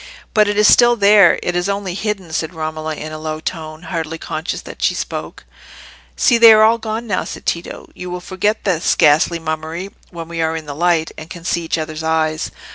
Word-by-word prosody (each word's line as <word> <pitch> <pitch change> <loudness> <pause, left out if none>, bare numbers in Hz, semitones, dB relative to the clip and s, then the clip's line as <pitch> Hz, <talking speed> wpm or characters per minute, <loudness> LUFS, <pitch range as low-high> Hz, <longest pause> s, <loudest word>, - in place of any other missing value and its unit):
"But 215 -1 +4
it 205 0 -1
is 210 0 +5
still 240 0 +6
there—it 200 -4 +4
is 175 +2 0
only 200 -2 -2
hidden," 195 -4 -4
said 160 +2 -3
Romola, 155 0 -4
in 155 +1 -7
a 155 - -7
low 155 0 -4
tone, 160 -1 -6
hardly 165 -2 -4
conscious 160 0 -4
that - - -11
she - - +2
spoke. - - -6 0.7
"See, 240 -2 +3
they 230 -1 +9
are 215 0 +6
all 225 +1 +4
gone 220 +1 -4
now!" 195 -5 -1
said - - -8
Tito. 170 0 -4
"You 180 - -8
will 180 0 -4
forget 190 +4 -2
this 180 -5 +1
ghastly 155 +3 +4
mummery 160 +3 -5 0.2
when 165 -2 -8
we 165 -1 -4
are 160 0 0
in 160 - -8
the 145 - -6
light, 165 +1 +1
and 155 - -10
can 170 -1 -10
see 170 - 0
each 165 - -1
other's 155 0 -5
eyes. 160 -1 0
170 Hz, 210 wpm, -18 LUFS, 160-200 Hz, 0.7 s, they